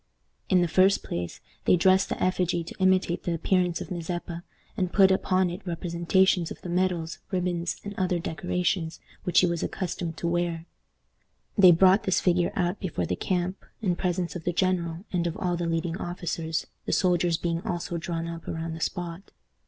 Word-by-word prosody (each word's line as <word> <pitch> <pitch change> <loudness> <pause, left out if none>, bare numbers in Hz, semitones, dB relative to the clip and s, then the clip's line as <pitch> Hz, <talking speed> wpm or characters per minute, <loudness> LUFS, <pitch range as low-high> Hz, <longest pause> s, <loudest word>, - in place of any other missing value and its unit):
In 180 -1 +5
the - - +1
first 185 +4 +4
place, 85 0 -5 0.2
they - - +6
dressed 190 +2 +4
the - - -3
effigy 180 -2 +1
to 165 - -9
imitate 185 -2 +2
the 175 - -1
appearance 180 +1 +1
of - - -7
Mazeppa, 175 0 -4 0.3
and 185 -4 -1
put 190 -1 +6
upon 185 -1 +2
it 180 +4 -6
representations 175 0 +1
of - - -8
the 180 - -5
medals, 175 -2 0
ribbons, 180 -2 -1
and 205 - -6
other 185 -1 +1
decorations 175 +1 -1 0.3
which 180 - +4
he - - +4
was 170 -2 -1
accustomed 170 -3 -3
to 170 - -2
wear. 170 -1 -1 0.9
They 190 -4 +8
brought 190 +4 +5
this 190 - +2
figure 180 -1 +2
out 180 +1 0
before 160 - -2
the 90 - -1
camp, 180 - -2 0.2
in 185 -5 0
presence 180 -1 -1
of 170 - -5
the 175 - -1
general 175 -1 0
and 175 -1 +1
of 165 - -4
all 180 -2 0
the 170 0 -2
leading 165 +1 -1
officers, 165 -2 -3 0.2
the - - 0
soldiers 175 -2 +2
being 170 -1 -1
also 175 -1 -3
drawn 165 0 -3
up 170 -1 -7
around 165 0 -3
the 160 - -7
spot. 175 +3 -4
175 Hz, 185 wpm, -27 LUFS, 170-185 Hz, 0.9 s, They